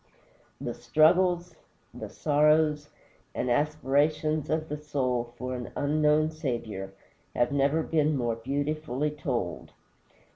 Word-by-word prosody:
The - - -4
struggles, 175 +2 +3 0.4
the - - -7
sorrows, 150 0 +2 0.5
and 125 - -1
aspirations 150 +2 +1
of 155 0 -1
the 150 - -3
soul 125 -5 -2
for 125 0 -4
an 125 -1 -6
unknown 150 +1 +2
Saviour 115 -10 -4 0.4
have 120 +2 +2
never 140 +3 +2
been 155 -2 +1
more 120 -3 0
beautifully 145 +3 -2
told. 150 - -4
150 Hz, 110 wpm, -28 LUFS, 130-155 Hz, 0.5 s, struggles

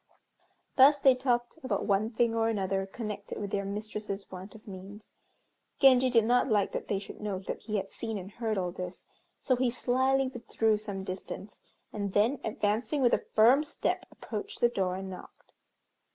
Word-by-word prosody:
Thus 280 +2 +8
they 270 -2 +6
talked 250 +2 -1
about 215 -7 -1
one 205 +2 +2
thing 235 0 +1
or 225 0 +2
another 195 -2 -1
connected 210 -1 -6
with 200 -1 -4
their 200 - 0
mistress's 210 0 -5
want 190 +3 -9
of 220 - -15
means. 200 +2 -10 0.7
Genji 260 -2 +6
did 230 -3 +4
not 245 +3 +3
like 205 -3 +2
that - - -4
they 200 - 0
should 195 - -9
know 205 -2 -2
that - - -5
he 215 -2 -3
had 195 0 -4
seen 225 -2 -4
and 195 +1 -8
heard 220 -1 -2
all 180 -2 -1
this, 180 +1 -7 0.3
so 255 - +1
he 250 0 +1
slyly 260 +2 +1
withdrew 225 -4 0
some 200 -3 -5
distance, 190 +2 -7 0.3
and 200 -2 -3
then 230 +6 +3
advancing 220 +6 0
with 245 - +4
a - - +1
firm 240 +6 +7
step, 300 - -2
approached 415 0 -6
the 240 - +4
door 190 -5 -1
and 190 0 -5
knocked. 185 - -12
215 Hz, 180 wpm, -30 LUFS, 195-245 Hz, 0.7 s, Thus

